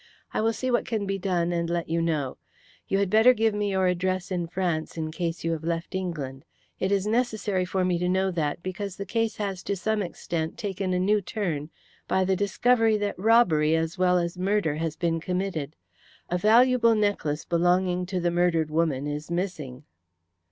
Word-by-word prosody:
"I - - 0
will 225 +1 +2
see 255 +3 -2
what 240 - +1
can 220 -3 -1
be 195 0 -2
done, 175 -2 0
and 170 -1 -1
let 170 -1 -1
you 165 +1 0
know. 155 -6 -1 0.5
You 195 - +1
had 200 -2 0
better 225 +4 +6
give 220 -1 +2
me 205 0 -1
your 190 -1 +1
address 185 +1 0
in 175 -2 -1
France, 170 -3 -2
in 155 -1 -3
case 165 0 -3
you 165 - 0
have 160 -1 -3
left 165 +1 -3
England. 150 -8 -4 0.4
It 190 - 0
is 200 -1 +1
necessary 215 -4 0
for 185 0 0
me 180 -1 +1
to 180 0 0
know 190 +1 +1
that, 160 -1 -2
because 190 +1 -4
the 200 - -5
case 225 +2 -1
has 195 -3 -3
to 200 - -2
some 215 +3 -1
extent 170 -3 -4
taken 195 -2 -3
a - - +1
new 205 +3 +2
turn 170 -8 -3 0.4
by 190 0 +2
the 190 0 +2
discovery 220 +3 +2
that 205 -3 -3
robbery 180 -8 +4
as 165 +3 -2
well 180 0 +4
as 175 +1 -2
murder 190 -5 +1
has 160 -1 -2
been 165 -1 0
committed. 175 -4 -3 0.6
A 180 - +2
valuable 230 +2 +5
necklace 205 -8 0
belonging 180 +1 +1
to 185 -1 -2
the 175 0 0
murdered 170 -3 +1
woman 155 -4 0
is 150 +2 -4
missing." 165 -7 -4
180 Hz, 195 wpm, -26 LUFS, 165-200 Hz, 0.6 s, better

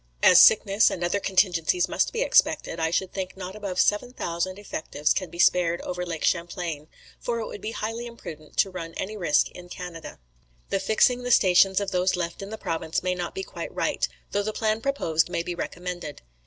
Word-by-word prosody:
"As - - +8
sickness 200 +3 +6
and 175 - -4
other 175 +4 +1
contingencies 190 - +2
must - - 0
be 480 +1 0
expected, 170 - +2
I 160 0 +1
should 185 +2 -1
think 190 -1 -5
not 185 +1 -7
above 200 -4 -4
7,000 185 -5 0
effectives 155 -7 -1
can 185 -3 -3
be 170 - -11
spared 175 -1 +3
over 180 0 -4
Lake 165 -3 -5
Champlain; 170 -3 -2 0.3
for 235 -1 -2
it 225 - -3
would 205 - -8
be 215 - -4
highly 225 +2 -4
imprudent 155 -10 -11
to 195 - +3
run 165 -2 -7
any 210 +3 -4
risk 170 -7 +2
in 180 0 -12
Canada. 175 -3 -8 0.5
"The 195 - +1
fixing 220 +5 +3
the 245 - -4
stations 190 -3 +5
of 200 -1 -3
those 185 0 +2
left 170 0 -4
in 195 - -7
the 220 - -6
province 165 -2 -2
may 185 0 +1
not 180 -1 -5
be 385 - -3
quite - - -7
right, - - 0 0.2
though 205 - +1
the 215 +1 -3
plan 220 0 0
proposed 170 - 0
may 170 - -2
be 175 - -4
recommended. 175 - -6
185 Hz, 200 wpm, -25 LUFS, 170-205 Hz, 0.5 s, As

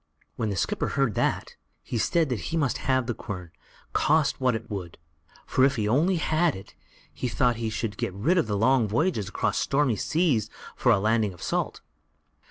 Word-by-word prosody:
When 110 - -1
the 100 - -2
skipper 85 - -1
heard 135 -5 +1
that, - - -1 0.3
he 115 - -3
said 160 +5 +1
he 125 - -2
must 140 -7 0
have 130 -1 +3
the 120 - -2
quern, 90 -6 -7 0.4
cost 155 -3 +2
what 125 -2 +2
it 110 +1 -5
would; 95 -5 -6 0.5
for 130 - +2
if 135 +1 +4
he 105 -3 -1
only 155 - +3
had 160 0 +1
it, 95 +1 -11 0.4
he 125 - -3
thought 120 0 +1
he 115 -1 -2
should 110 -1 -3
be - - -1
rid 115 - +1
of 140 - 0
his 105 -2 -1
long 120 +1 +3
voyages 110 - 0
across - - -1
stormy 135 -4 +2
seas 145 - +1 0.3
for 125 - +3
a 110 - +5
lading 110 -1 +1
of 85 - -11
salt. - - -2
120 Hz, 190 wpm, -26 LUFS, 105-140 Hz, 0.5 s, a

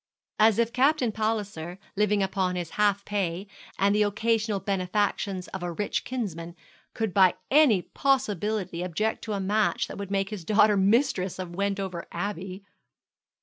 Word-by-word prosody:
As 215 -1 +5
if 235 0 +1
Captain 265 -2 +3
Palliser, 205 -6 -3 0.2
living 210 0 +2
upon 190 -1 -1
his 175 -2 -4
half 205 -1 +1
pay, 195 -2 -2 0.3
and 200 +1 +3
the 210 - +2
occasional 215 0 +1
benefactions 195 -1 -1
of 190 - -6
a 175 0 -3
rich 205 +5 -2
kinsman, 175 -9 -4 0.4
could 220 -4 -2
by 190 -2 +5 0.2
any 265 - +5
possibility 210 -8 -1
object 185 +5 -2
to 215 - -3
a 200 - -2
match 205 +3 +1
that - - -8
would 200 -1 -5
make 195 0 -1
his 205 -5 -6
daughter 210 +3 +4
mistress 195 -1 +2
of 180 -2 -6
Wendover 195 -3 -2
Abbey! 195 -1 -5
200 Hz, 150 wpm, -27 LUFS, 185-215 Hz, 0.4 s, As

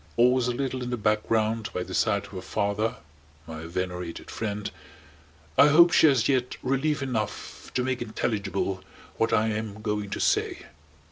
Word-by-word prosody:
Always 125 +1 +4
a - - +1
little 130 +1 -2
in 125 - -3
the 120 - -1
background 110 +1 +1
by 90 - -1
the 95 - -8
side 105 -2 +1
of - - -14
her 95 -2 -6
father 105 +4 -1 0.5
(my 80 0 -7
venerated 90 0 -4
friend) 105 -2 -3 0.9
I 140 - +9
hope 170 +4 +7
she - - +6
has 130 -5 +3
yet 130 -2 0
relief 135 +3 0
enough 115 -6 -4
to 125 - +2
make 130 -1 -1
intelligible 100 -4 -2 0.3
what 115 0 +1
I 110 0 +3
am 105 -1 -4
going 105 -2 -2
to - - -4
say. - - +1
110 Hz, 165 wpm, -27 LUFS, 100-125 Hz, 0.9 s, I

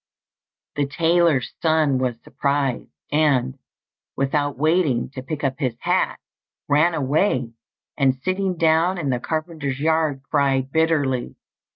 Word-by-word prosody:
The 145 -1 +1
tailor's 165 -2 +2
son 155 -5 +2
was 125 -2 -1
surprised, 140 -3 -1 0.2
and, 140 -4 +1 0.6
without 145 +1 -1
waiting 150 -5 +1
to 135 - -7
pick 150 +3 -6
up 135 0 -1
his 130 -6 -1
hat, - - 0 0.5
ran 155 +4 +3
away, 135 - 0 0.5
and 135 -2 +3
sitting 185 -1 -1
down 165 +3 +3
in 145 -6 -1
the 125 - 0
carpenter's 155 -2 -3
yard, 155 -3 +1
cried 135 -2 0
bitterly. 145 -6 0
145 Hz, 125 wpm, -22 LUFS, 135-160 Hz, 0.6 s, ran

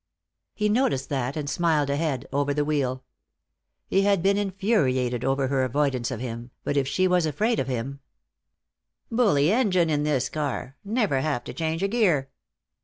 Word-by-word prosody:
He 210 - +1
noticed 210 - +1
that, 135 0 -2
and 150 -2 -3
smiled 155 -3 +1
ahead, 140 -3 -1
over 145 0 0
the 145 0 +1
wheel. 130 -4 -1 0.8
He 195 - +2
had 200 -3 +2
been 200 +1 +4
infuriated 180 - 0
over 135 +1 +1
her 135 -1 +1
avoidance 130 -1 0
of 130 -4 -4
him, 120 -1 -6
but 145 - -1
if 140 -2 +1
she 185 +7 +2
was 180 -3 +2
afraid 220 +9 0
of - - -1
him 130 +2 -3 1.1
"Bully 195 - +3
engine 185 -8 +2
in 145 -1 +1
this 150 -4 +1
car. 140 -3 -4
Never 205 - 0
have 145 -4 -1
to - - -7
change 160 +2 -2
a - - +3
gear." 180 - +1
145 Hz, 170 wpm, -25 LUFS, 135-190 Hz, 1.1 s, been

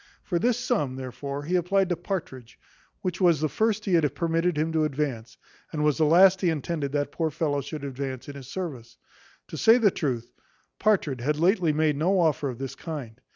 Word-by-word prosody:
For 175 -3 -1
this 240 +2 +2
sum, 230 - -1
therefore, 140 +2 -5
he 175 +5 -1
applied 185 +2 +2
to 175 - +1
Partridge, 160 - -6 0.4
which 185 0 -3
was 170 -5 +4
the 155 - +1
first 220 +5 0
he 190 - 0
had 160 -4 +2
permitted 165 0 0
him 155 +2 0
to 160 -1 +1
advance, 135 -6 -3 0.3
and 150 -1 -2
was 150 0 +2
the 155 - +4
last 185 +3 +6
he 180 - +3
intended 155 -2 -2
that 145 -1 -1
poor 160 -2 -1
fellow 145 -1 -1
should 145 +1 -7
advance 135 -2 -5
in 145 - -8
his 135 -3 -10
service. 130 -9 -6 0.5
To - - -6
say 225 +2 +6
the 215 -5 +4
truth, 120 -8 -3 0.5
Partridge 165 - +1
had 150 +4 0
lately 175 0 +3
made 150 -1 +1
no 185 +6 +2
offer 150 -4 +1
of 125 - -6
this 135 +1 -5
kind. 135 -7 -7
155 Hz, 200 wpm, -26 LUFS, 140-180 Hz, 0.5 s, last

